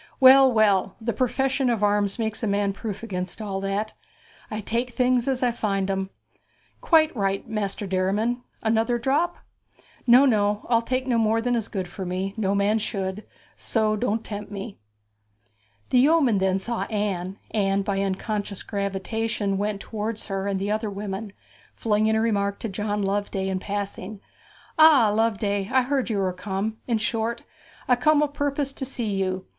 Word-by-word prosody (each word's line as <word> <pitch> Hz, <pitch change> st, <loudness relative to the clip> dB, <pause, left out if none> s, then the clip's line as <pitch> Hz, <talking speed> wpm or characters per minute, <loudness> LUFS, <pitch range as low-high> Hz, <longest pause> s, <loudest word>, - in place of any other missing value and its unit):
'Well, 265 Hz, 0 st, +8 dB
well, 205 Hz, -4 st, +3 dB
the 235 Hz, 0 st, -2 dB
profession 265 Hz, +3 st, +1 dB
of 225 Hz, -3 st, 0 dB
arms 205 Hz, -1 st, +2 dB
makes 220 Hz, -2 st, -2 dB
a 225 Hz, -, -1 dB
man 200 Hz, 0 st, +1 dB
proof 210 Hz, +1 st, -6 dB
against 185 Hz, -4 st, -4 dB
all 195 Hz, -3 st, -3 dB
that. 200 Hz, +2 st, -2 dB, 0.6 s
I 215 Hz, -, -4 dB
take 235 Hz, +3 st, -2 dB
things 250 Hz, -1 st, +2 dB
as 260 Hz, -1 st, 0 dB
I 245 Hz, -, +3 dB
find 195 Hz, -4 st, -1 dB
'em.' 190 Hz, 0 st, -2 dB, 0.7 s
'Quite 315 Hz, -3 st, +4 dB
right, 195 Hz, -2 st, -1 dB
Master 210 Hz, -2 st, -2 dB
Derriman. 200 Hz, +6 st, 0 dB, 0.2 s
Another 225 Hz, +2 st, +2 dB
drop?' 290 Hz, +9 st, 0 dB, 0.7 s
'No, 250 Hz, +3 st, +7 dB
no. 210 Hz, -4 st, +1 dB
I'll 230 Hz, -1 st, +5 dB
take 255 Hz, +2 st, -2 dB
no 245 Hz, -3 st, +1 dB
more 225 Hz, 0 st, +2 dB
than 245 Hz, +2 st, 0 dB
is 225 Hz, -3 st, -1 dB
good 190 Hz, -4 st, -4 dB
for 190 Hz, +2 st, -7 dB
me 185 Hz, +2 st, -3 dB
no 200 Hz, -3 st, 0 dB
man 205 Hz, +2 st, +2 dB
should; 195 Hz, -1 st, -3 dB, 0.3 s
so 215 Hz, -2 st, 0 dB
don't 225 Hz, 0 st, -1 dB
tempt 205 Hz, -1 st, -6 dB
me.' 200 Hz, -, -7 dB, 1.1 s
The 250 Hz, -, +5 dB
yeoman 275 Hz, -6 st, +4 dB
then 190 Hz, 0 st, +2 dB
saw 230 Hz, +4 st, -3 dB
Anne, 195 Hz, -3 st, -2 dB
and 195 Hz, -2 st, +1 dB
by 200 Hz, -2 st, -1 dB
an 195 Hz, 0 st, +1 dB
unconscious 205 Hz, -1 st, -4 dB
gravitation 200 Hz, +1 st, -2 dB
went 205 Hz, 0 st, -1 dB
towards 215 Hz, +1 st, -4 dB
her 195 Hz, 0 st, -2 dB
and 195 Hz, -1 st, -1 dB
the 200 Hz, +2 st, -2 dB
other 215 Hz, 0 st, -1 dB
women, 200 Hz, +1 st, -5 dB, 0.4 s
flinging 215 Hz, 0 st, +1 dB
a 220 Hz, -, +2 dB
remark 200 Hz, -3 st, 0 dB
to 225 Hz, -, -3 dB
John 205 Hz, +1 st, -2 dB
Loveday 195 Hz, -1 st, -1 dB
in 190 Hz, -1 st, -1 dB
passing. 200 Hz, 0 st, -5 dB, 0.6 s
'Ah, 300 Hz, -8 st, +7 dB
Loveday! 205 Hz, -2 st, 0 dB
I 260 Hz, -1 st, +4 dB
heard 265 Hz, -1 st, -1 dB
you 215 Hz, -, 0 dB
were 190 Hz, -2 st, 0 dB
come; 200 Hz, +3 st, -3 dB
in 235 Hz, -3 st, +2 dB
short, 225 Hz, +2 st, -2 dB, 0.4 s
I 250 Hz, -, +5 dB
come 300 Hz, +4 st, +3 dB
o' -, -, +2 dB
purpose 285 Hz, -1 st, -2 dB
to 275 Hz, -, -6 dB
see 255 Hz, -3 st, -3 dB
you. 190 Hz, -1 st, -2 dB
210 Hz, 170 wpm, -25 LUFS, 195-235 Hz, 1.1 s, Well